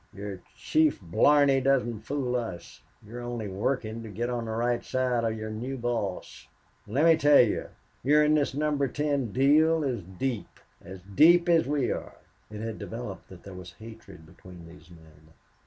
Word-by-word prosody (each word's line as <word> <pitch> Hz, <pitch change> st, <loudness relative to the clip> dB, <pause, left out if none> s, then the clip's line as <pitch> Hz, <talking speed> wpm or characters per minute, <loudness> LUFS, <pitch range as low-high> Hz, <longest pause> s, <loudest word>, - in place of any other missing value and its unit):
"Your 100 Hz, -2 st, -7 dB
chief 155 Hz, -1 st, +1 dB
blarney 135 Hz, -, +3 dB
doesn't 120 Hz, -5 st, 0 dB
fool 135 Hz, -3 st, -2 dB
us. 110 Hz, -9 st, -6 dB, 0.2 s
You're 120 Hz, +3 st, -8 dB
only 120 Hz, -3 st, -5 dB
working 110 Hz, +3 st, -3 dB
to 110 Hz, -, -9 dB
get 120 Hz, +5 st, -3 dB
on 120 Hz, -1 st, -3 dB
the 110 Hz, -, -5 dB
right 120 Hz, +1 st, -1 dB
side 125 Hz, -2 st, -1 dB
of 110 Hz, -1 st, -1 dB
your 110 Hz, 0 st, -6 dB
new 125 Hz, +5 st, -5 dB
boss.... 115 Hz, -6 st, -4 dB, 0.4 s
Let 135 Hz, +10 st, +1 dB
me 165 Hz, -1 st, +7 dB
tell 145 Hz, -2 st, +6 dB
you 115 Hz, -4 st, 0 dB, 0.3 s
you're 150 Hz, +4 st, +4 dB
in 150 Hz, 0 st, +3 dB
this 145 Hz, -3 st, +1 dB
Number 145 Hz, -1 st, 0 dB
Ten 140 Hz, -3 st, -2 dB
deal 155 Hz, +5 st, +3 dB
as 125 Hz, -6 st, -2 dB
deep 100 Hz, +6 st, -5 dB, 0.2 s
as 95 Hz, +1 st, -10 dB
deep 165 Hz, -, +5 dB
as 165 Hz, -4 st, +3 dB
we 140 Hz, -3 st, 0 dB
are." -, -, -6 dB, 0.3 s
It 105 Hz, 0 st, -8 dB
had 115 Hz, -1 st, -5 dB
developed 115 Hz, -4 st, -7 dB
that 95 Hz, -2 st, -13 dB
there 100 Hz, -, -10 dB
was 90 Hz, -1 st, -10 dB
hatred 110 Hz, -7 st, -13 dB
between 90 Hz, +1 st, -14 dB
these 80 Hz, -1 st, -16 dB
men. 80 Hz, -2 st, -19 dB
120 Hz, 175 wpm, -27 LUFS, 100-140 Hz, 0.4 s, me